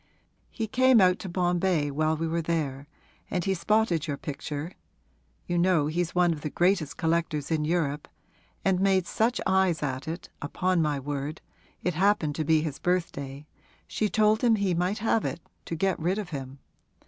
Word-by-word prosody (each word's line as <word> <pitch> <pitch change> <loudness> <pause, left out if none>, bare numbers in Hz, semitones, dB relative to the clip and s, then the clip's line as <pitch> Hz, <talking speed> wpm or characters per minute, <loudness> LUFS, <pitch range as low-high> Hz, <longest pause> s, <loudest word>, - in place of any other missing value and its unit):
He 225 - -3
came 255 +2 +4
out 185 -1 +4
to 190 - -6
Bombay 175 -3 +1
while 155 +2 +1
we 165 +1 -1
were 165 +1 -1
there 145 -4 -2 0.4
and 180 -3 -1
he 195 - +2
spotted 180 -3 +1
your 145 -2 -2
picture 150 +3 -5 0.7
(you 175 0 0
know 175 -4 +3
he's 170 +3 -2
one 175 -1 +4
of 150 - -8
the 150 - -3
greatest 175 -2 +1
collectors 165 -3 -1
in 155 -2 +1
Europe), 150 -3 -1 0.6
and 190 -2 +3
made 190 -2 +3
such 230 +6 0
eyes 190 -4 +2
at 130 -1 -3
it 165 +3 -4
that, - - -14 0.2
upon 180 +2 +1
my 150 -2 0
word 145 +2 -4 0.4
it 180 - 0
happened 185 -3 +2
to 155 - 0
be 155 +1 +3
his 150 -4 -4
birthday 145 -6 -2 0.4
she 215 - -1
told 215 +1 +3
him 235 -2 +5
he 200 -3 0
might 180 +4 0
have 225 0 +1
it, - - -3 0.3
to 165 - -4
get 190 +3 0
rid 180 +5 0
of 205 -4 -4
him. 135 -2 -6
170 Hz, 185 wpm, -27 LUFS, 150-190 Hz, 0.7 s, him